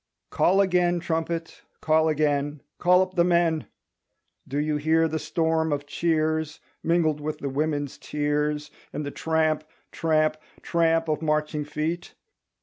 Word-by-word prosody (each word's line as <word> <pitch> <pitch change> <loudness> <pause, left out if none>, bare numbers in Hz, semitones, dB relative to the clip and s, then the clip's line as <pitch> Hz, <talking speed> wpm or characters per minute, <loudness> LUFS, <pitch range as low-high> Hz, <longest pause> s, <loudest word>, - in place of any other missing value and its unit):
Call 195 +2 +4
again, 180 -2 +2
trumpet, 165 0 -3 0.2
call 160 0 +3
again, 145 -1 0 0.2
Call 180 +1 +5
up 185 0 -7
the 175 -2 +3
men! 170 -3 +2 0.8
Do 140 - -3
you 150 0 0
hear 160 +2 +3
the 160 0 -2
storm 160 +1 0
of 145 0 -2
cheers 155 0 0 0.2
Mingled 160 -3 +1
with 155 +1 -3
the 140 - -4
women's 145 0 -2
tears 150 0 -1 0.2
And 150 - -4
the 145 - -4
tramp, 160 -1 0 0.3
tramp, 155 -1 +1 0.3
tramp 165 -1 +2
of 155 0 -1
marching 150 -1 0
feet? 160 +4 -3
155 Hz, 140 wpm, -25 LUFS, 150-165 Hz, 0.8 s, Call